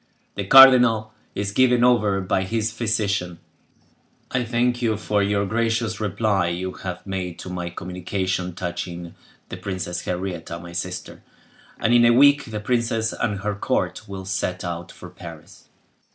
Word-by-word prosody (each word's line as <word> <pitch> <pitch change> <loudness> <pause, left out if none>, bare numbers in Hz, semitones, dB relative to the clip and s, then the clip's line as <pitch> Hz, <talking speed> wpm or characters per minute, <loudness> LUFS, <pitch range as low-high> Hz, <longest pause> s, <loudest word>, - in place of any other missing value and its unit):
The 100 - -4
cardinal 125 -4 +7 0.2
is 100 0 -2
given 125 +1 +3
over 105 -6 +3
by 95 0 0
his 110 +3 -1
physician. 100 -6 -1 0.9
I 125 - 0
thank 120 +1 0
you 110 -3 +1
for 105 -1 0
the 100 0 +1
gracious 115 +2 -1
reply 105 -2 0
you 90 +2 -3
have 90 -1 -7
made 95 -3 -4
to 90 - -8
my 90 -1 -4
communication 90 +1 -3
touching 85 -1 -5 0.4
the - - -6
Princess 90 -2 -4
Henrietta, 90 -2 -4
my 85 0 -10
sister, 90 +1 -5 0.6
and, 115 - +2
in 120 0 +6
a 120 0 +6
week, 145 +3 +5
the 110 -2 -5
princess 115 -1 0
and 105 -5 -2
her 105 +1 -1
court 100 - -2
will 95 -1 -7
set 95 -1 -2
out 85 -1 -5
for - - -11
Paris. - - -12
100 Hz, 150 wpm, -23 LUFS, 90-115 Hz, 0.9 s, cardinal